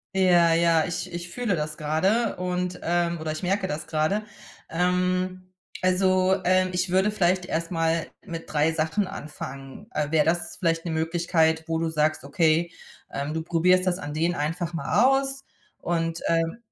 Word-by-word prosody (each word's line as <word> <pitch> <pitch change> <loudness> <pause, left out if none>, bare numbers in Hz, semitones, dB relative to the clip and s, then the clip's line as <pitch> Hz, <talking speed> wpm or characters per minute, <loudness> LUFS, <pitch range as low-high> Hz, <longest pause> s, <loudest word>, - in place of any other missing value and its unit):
Ja, 175 -3 +5
ja. 165 -1 +3
Ich 180 +1 -4
ich 175 +1 -6
fühle 225 0 -1
das 150 -1 -3
grade 190 +10 +1
und, 180 0 -2
ähm 170 0 0
oder 155 0 -3
ich 155 - -5
merke 190 +2 0
das 150 -2 -4
grade. 160 +6 0 0.5
Ähm, 185 +1 0 0.3
also, 185 0 +3
ähm, 185 +1 +3
ich 180 0 -1
würde 190 +3 +3
vielleicht 185 -3 +1
erst 165 +1 -2
mal 165 -1 +1 0.2
mit 165 -3 -7
3 150 +1 +3
Sachen 160 +5 0
anfangen. 135 +1 -8
Äh, 150 -1 -2
wäre 155 -2 +4
das 170 +2 -1
vielleicht 165 -1 0
'ne 165 - -2
Möglichkeit, 160 0 +1
wo 165 0 -1
du 165 0 0
sagst: 155 0 0
„Okay“, 160 +3 +2 0.4
ähm, 140 +2 -3
du 160 - -2
probierst 180 +3 +2
das 180 -1 +1
an 145 -4 -6
denen 165 +2 0
einfach 165 +3 -2
mal 170 +7 +1 0.2
aus 270 0 -4 0.4
und, 165 -1 -1
ähm 165 +3 +1
170 Hz, 170 wpm, -25 LUFS, 160-185 Hz, 0.5 s, Ja